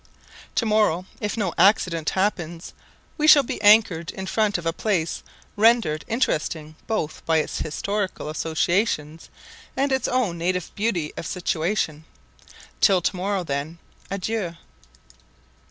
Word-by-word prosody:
To 230 - +1
morrow, 210 -5 +2
if 210 +2 -3
no 195 -6 -1
accident 180 -6 +3
happens, 175 -4 -2 0.5
we 305 - +2
shall 290 -2 +8
be 235 - -5
anchored 205 -6 +5
in 190 - -6
front 210 0 +1
of 175 - -8
a 165 - 0
place 175 -5 -1 0.3
rendered 215 -8 +3
interesting 155 -9 -1
both 190 -9 -3
by 165 -1 +3
its 155 - -1
historical 200 +2 -3
associations 160 0 -1 0.5
and 275 +1 +1
its 265 0 +1
own 225 -10 0
native 180 +1 -1
beauty 190 -8 -1
of 165 - -5
situation. 165 -3 -1 0.7
Till 195 -3 +5
to - - 0
morrow, 190 +1 -1
then, 145 +2 -4 0.3
adieu. 195 -2 -3
185 Hz, 130 wpm, -23 LUFS, 160-215 Hz, 0.7 s, shall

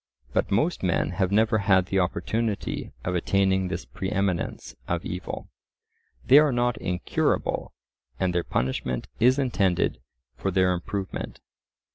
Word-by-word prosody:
But - - +1
most 150 - +1
men 90 -1 +1
have 95 +1 0
never 110 +2 +3
had 95 -2 +4
the 95 +1 0
opportunity 105 +4 -1
of 90 - -1
attaining 95 +1 +2
this 90 -1 -4
pre 95 - -5
eminence 95 -4 -1
of - - -2
evil. 90 0 -5 0.8
They 135 +3 +8
are 150 -2 +4
not 120 -1 +1
incurable, 90 -1 -1 0.5
and 95 -2 +1
their 85 -1 +1
punishment 65 -2 -2
is 125 +3 +5
intended 105 -10 +1 0.4
for 95 - -2
their 95 -1 +3
improvement. 95 +2 -4
95 Hz, 135 wpm, -26 LUFS, 90-110 Hz, 0.8 s, They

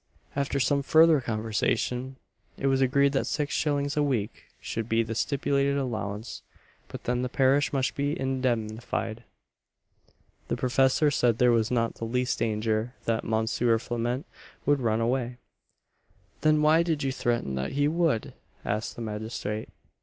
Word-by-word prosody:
After 140 0 0
some 140 +2 +2
further 160 +1 +5
conversation, 115 +3 -1 0.4
it - - -4
was 135 0 +3
agreed 140 +2 +3
that 135 - 0
six 150 -1 -1
shillings 145 -1 0
a 150 - +2
week 125 -8 -1
should 115 0 -4
be 115 +1 +3
the 115 0 -4
stipulated 140 +3 +1
allowance; 110 -4 -4 0.5
but - - -9
then 125 0 0
the 125 - -2
parish 135 +1 +3
must 135 -2 0
be 145 +2 -1
indemnified. 120 -3 -2 1.2
The - - -1
professor 130 +3 +3
said 120 -4 +2
there 125 0 +4
was 115 -1 +2
not 115 -2 0
the 115 - -6
least 125 +2 -1
danger 110 +2 -1
that 115 -1 0
Mons. 110 0 0
Flament 120 +3 0 0.4
would 145 -1 +3
run 115 -1 +1
away 120 +1 -1 1.0
"Then 155 -1 +3
why 155 +2 +5
did 160 -4 -1
you 135 - 0
threaten 120 - -1
that 65 0 -3
he 145 +1 +2
would?" 160 -7 0 0.3
asked 105 +2 -2
the 120 - -6
magistrate. 110 0 -4
125 Hz, 150 wpm, -27 LUFS, 115-140 Hz, 1.2 s, further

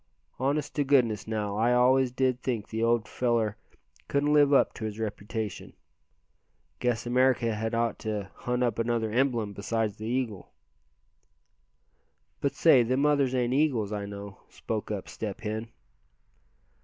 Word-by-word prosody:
"Honest 140 +3 -1
to 145 - +3
goodness 125 -7 +2
now, 105 -2 -2
I 120 +3 +3
always 130 +1 +4
did 130 0 0
think 120 -6 -3
the 110 0 -3
old 115 -1 +2
feller 115 -4 0 0.5
couldn't 145 +1 +1
live 145 -1 +5
up 140 - +4
to 110 - -6
his 105 -1 -5
reputation. 110 -1 -5 1.1
Guess 120 -2 0
America 125 -2 +2
had 110 +2 -2
ought 115 -1 0
to 105 -3 -4
hunt 125 0 -2
up 120 -1 0
another 115 -1 0
emblem 120 -4 +1
besides 105 +1 -2
the 110 - -6
eagle." 120 -5 -3 1.9
"But 140 - 0
say, 145 -7 +6
them 130 +4 +1
others 140 -3 +2
ain't 125 -1 +1
eagles, 130 -8 +1
I 100 -1 -3
know," 100 -1 -8
spoke 110 -2 -4
up 105 -3 -4
Step 105 -3 -6
Hen. 110 +1 -3
115 Hz, 145 wpm, -28 LUFS, 110-130 Hz, 1.9 s, say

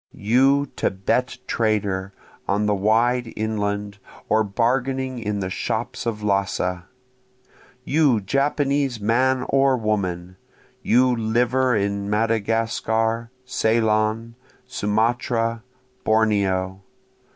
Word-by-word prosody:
You 135 +7 +3
Thibet 110 +7 -1
trader 100 -4 -1 0.4
on 105 +2 +1
the 105 - +2
wide 115 +4 +1
inland 105 -2 -2 0.3
or 110 +1 +3
bargaining 130 +4 -1
in 105 -2 -3
the 95 0 -3
shops 120 - -3
of 105 -2 -3
Lassa! 100 -3 -1 1.0
You 140 -5 +3
Japanese 140 +3 0
man 125 +4 +1
or 135 -1 +3
woman! 95 -5 -2 0.4
you 125 0 +3
liver 120 +3 +1
in 100 0 -1
Madagascar, 115 +1 0 0.2
Ceylon, 110 -1 +1 0.3
Sumatra, 115 +2 0 0.4
Borneo! 100 -4 +1
110 Hz, 90 wpm, -22 LUFS, 100-125 Hz, 1.0 s, You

